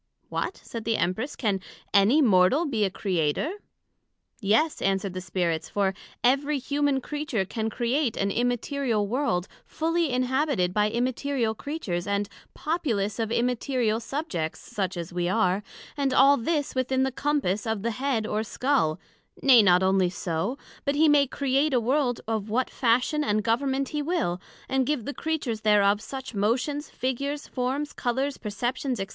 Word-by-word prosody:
What, - - -3
said 230 -2 -7
the 225 0 +1
Empress, 185 - -1
can 205 -5 0 0.3
any 220 +10 +5
Mortal 210 - +4
be 230 -8 0
a - - 0
Creator? 180 - -1 0.9
Yes, 225 +9 +2
answered 195 -1 0
the 185 - -4
Spirits; 170 -2 -1
for 195 -2 +1 0.3
every 280 +4 +3
human 280 0 0
Creature 290 -9 -2
can 220 +3 -3
create 240 +2 0
an 200 0 0
Immaterial 245 -1 0
World 205 -6 0 0.2
fully 330 0 0
inhabited 255 - +1
by 210 +1 +2
Immaterial 245 0 0
Creatures, 210 - -4
and 200 0 0 0.3
populous 235 - -1
of 225 -1 -1
Immaterial 245 -2 0
subjects, 230 - -3
such 190 -3 -3
as 170 0 -5
we 175 0 0
are, 185 +1 +2 0.3
and 275 -3 0
all 275 +1 +7
this 290 +3 -1
within 260 0 +1
the 265 - 0
compass 255 -7 0
of 220 -2 -2
the 235 - 0
head 255 -2 -1
or 215 0 -1
scull; 225 - 0 0.4
nay, 255 -4 +8
not 180 -2 +5
onely 190 -1 +3
so, 175 +7 -2 0.3
but 280 0 0
he 315 +2 +5
may 290 -2 +5
create 275 +2 +1
a - - +4
World 250 +1 +1
of 220 -2 -2
what 250 +4 0
fashion 255 +5 +2
and 210 -5 +1
Government 265 +4 0
he 300 - -2
will, 290 - -1 0.3
and 265 -1 +1
give 295 -7 -1
the 285 - -3
Creatures 290 -10 -2
thereof 205 -1 +4
such 265 +2 -7
motions, 250 +8 0
figures, 280 +3 -3
forms, 265 +3 -2
colours, 265 +3 -1
perceptions, 245 +5 -2
&c. 195 - -2
240 Hz, 160 wpm, -26 LUFS, 205-280 Hz, 0.9 s, nay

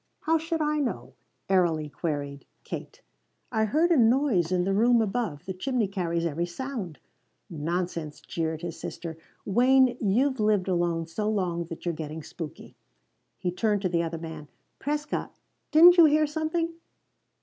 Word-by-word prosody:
"How 325 +1 +2
should 325 0 -2
I 300 0 +1
know?" 130 - -3 0.3
airily 170 -5 +2
queried 145 -2 -4 0.2
Kate. - - -8 0.5
"I 220 -2 +2
heard 315 +10 +2
a 335 - +5
noise 230 - +3
in 180 -1 +2
the 195 +2 0
room 235 +4 +4
above. 215 -8 -2
This 190 -1 -5
chimney 245 0 0
carries 170 -4 -2
every 170 +2 -1
sound." 200 - -5 0.5
"Nonsense," 165 -1 -3
jeered 160 0 -3
his 170 -1 -5
sister. 165 -2 -6 0.3
"Wayne, 250 +3 +4
you've 250 +6 +2
lived 210 -3 +2
alone 170 -2 0
so 210 +6 -2
long 180 -5 -1
that 165 +1 -9
you're 170 - 0
getting 155 0 -6
spooky." 160 0 -9 0.6
He 180 - -2
turned 205 +2 0
to 185 - +1
the 170 -1 +1
other 165 0 -3
man. 160 -2 -8 0.3
"Prescott, 300 +2 -3 0.3
didn't 345 +4 +8
you 340 - +9
hear 305 0 +4
something?" 320 +2 -2
190 Hz, 155 wpm, -27 LUFS, 165-260 Hz, 0.6 s, you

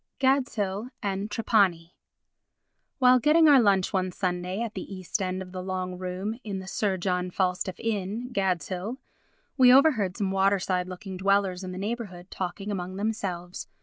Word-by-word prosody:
Gadshill 250 -6 0
and 200 +1 -2
Trapani 195 -6 +1 1.0
While 255 -1 +6
getting 315 +5 +5
our 280 -4 +7
lunch 195 -3 +2
one 185 -1 0
Sunday 180 +1 -2
at 230 -2 -3
the - - -7
east 185 +1 -3
end 185 0 -2
of 180 - -13
the 185 0 -5
long 185 -1 -3
room 185 +5 -4
in 200 -3 -4
the 190 - -7
Sir 195 0 -1
John 180 0 -1
Falstaff 180 0 -1
Inn, 225 +3 -3
Gadshill, 190 - -1 0.6
we 255 -2 +7
overheard 250 - +4
some 200 -4 -1
waterside 190 -2 +1
looking 185 +1 -7
dwellers 195 -1 +1
in 185 - -5
the 185 - -7
neighbourhood 195 -4 -5
talking 195 +3 -4
among 185 -1 -4
themselves. 190 -4 -3
195 Hz, 155 wpm, -27 LUFS, 185-215 Hz, 1.0 s, our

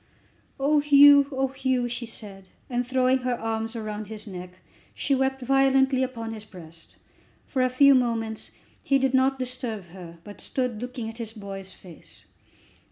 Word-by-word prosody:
"Oh, 295 +2 +3
Hugh! 285 -1 +7
oh, 265 0 0
Hugh!" 260 -2 -1
she 240 0 -5
said, 195 -4 -9 0.2
and, 245 0 -1
throwing 260 0 +2
her 250 -1 -2
arms 225 0 -3
round 215 -2 -5
his 215 -1 -8
neck, 180 -2 -9 0.4
she 280 - 0
wept 265 0 0
violently 270 0 +3
upon 230 -3 -3
his 215 -1 -7
breast. 165 -6 -12 0.5
For 260 - -1
a 255 - +3
few 275 +2 +6
moments 230 -3 -1 0.3
he 275 - +3
did 270 -1 +1
not 265 +1 +3
disturb 250 -6 -4
her, 170 -2 -11
but 205 +2 -11
stood 250 -4 -3
looking 245 -2 -5
at 225 +1 -8
his 225 -1 -5
boy's 195 -3 -7
face. 160 - -12
245 Hz, 165 wpm, -25 LUFS, 215-265 Hz, 0.5 s, Hugh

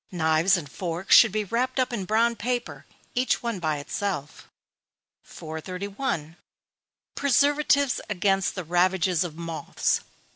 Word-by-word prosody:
Knives 165 +2 +3
and 160 -4 -6
forks 175 +4 +1
should 225 - +7
be 215 +1 -1
wrapped 250 +6 -1
up 255 -1 0
in 200 -5 -3
brown 230 +4 +2
paper, 245 +3 -4 0.3
each 250 0 0
one 235 -5 -2
by 155 -3 -1
itself. 150 0 -4 0.7
431. 175 - -5 0.8
_Preservatives 285 0 +2
against 195 -1 +1
the 185 - -4
ravages 180 +1 +2
of 165 -3 -6
Moths. 165 -1 -2
195 Hz, 120 wpm, -25 LUFS, 165-235 Hz, 0.8 s, should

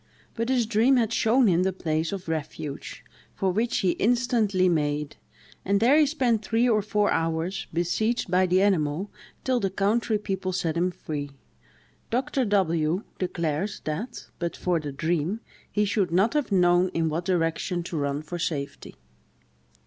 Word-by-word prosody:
But 230 +1 -2
his 250 -3 +2
dream 230 +4 +3
had 230 -2 +1
shown 240 +4 +3
him 180 -4 +3
the 190 +1 +2
place 160 -3 -2
of 195 -3 -5
refuge, 155 -2 -5 0.3
for 190 -1 0
which 225 +5 0
he 185 - +3
instantly 225 -5 +2
made; 150 -3 0 0.5
and 200 +1 +2
there 245 +6 +5
he 305 -1 +5
spent 250 -7 +1
three 230 +2 +2
or 215 -3 +3
four 210 0 +1
hours, 165 +3 -1
besieged 190 +6 0
by 185 +1 +4
the 185 +2 +3
animal, 180 -1 +1 0.3
till 255 -1 +1
the 195 - 0
country 210 +3 +1
people 190 -2 -3
set 165 -3 -1
him 175 +2 +1
free. 150 -4 -5 0.8
Dr. 255 +2 0
W—— 175 -3 +1 0.2
declares 170 +1 -2
that, 200 +11 -5
but 170 -1 -3
for 175 -2 0
the 150 -2 -5
dream, 165 +7 -1 0.3
he 210 0 +1
should 200 -2 +1
not 195 +6 +3
have 295 -7 0
known 180 -1 +4
in 165 -1 +1
what 160 +3 -2
direction 175 0 0
to 170 - -6
run 140 0 -1
for 175 +3 -6
safety. 140 -4 -4
185 Hz, 165 wpm, -26 LUFS, 165-220 Hz, 0.8 s, there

